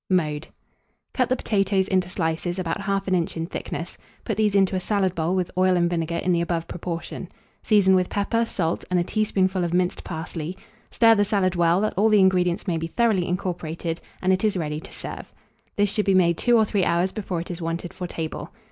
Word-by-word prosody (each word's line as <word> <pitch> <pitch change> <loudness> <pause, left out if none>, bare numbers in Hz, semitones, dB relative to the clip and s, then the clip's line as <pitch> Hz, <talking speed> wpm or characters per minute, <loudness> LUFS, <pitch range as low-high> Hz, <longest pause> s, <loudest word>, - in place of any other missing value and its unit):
Mode. 155 -4 0 0.7
Cut 255 -3 +1
the 255 - +3
potatoes 195 -4 +1
into 185 -2 +1
slices 170 +1 -2
about 175 -1 -2
1/2 195 -1 -1
inch 170 -2 0
in 165 - -2
thickness; 170 - -6 0.3
put 220 - -1
these 210 -1 +1
into 195 -1 +3
a - - +1
salad 190 -1 0
bowl 170 +1 0
with 180 -2 -1
oil 185 0 +3
and 175 0 +2
vinegar 170 -1 -1
in 180 - 0
the 170 -1 +2
above 170 -1 -2
proportion; 170 -1 -5 0.3
season 200 -3 +4
with 185 -1 +2
pepper, 220 +3 0
salt, 170 -5 -1
and 180 -1 +2
a - - +2
teaspoonful 190 -2 0
of 170 0 -1
minced 180 0 0
parsley; 160 +1 -5 0.3
stir 230 -1 +5
the 205 -2 +3
salad 195 -3 +1
well, 170 0 +3
that 215 - 0
all 215 +3 +4
the 210 -1 +5
ingredients 180 -2 +2
may 175 -5 0
be 165 - -3
thoroughly 210 -2 +1
incorporated, 170 -2 -3 0.2
and 185 +1 +4
it 185 - 0
is 210 -3 +2
ready 150 -3 -2
to 190 - -11
serve. - - -7 0.4
This 205 -1 +2
should 210 0 0
be 195 -2 +3
made 170 -2 +4
two 240 +7 +3
or 220 - +4
three 200 -2 0
hours 175 +2 +1
before 190 -5 -3
it 170 - -5
is 175 0 -6
wanted 165 +1 -3
for 180 - -5
table. 160 -2 -5
185 Hz, 215 wpm, -24 LUFS, 170-200 Hz, 0.7 s, stir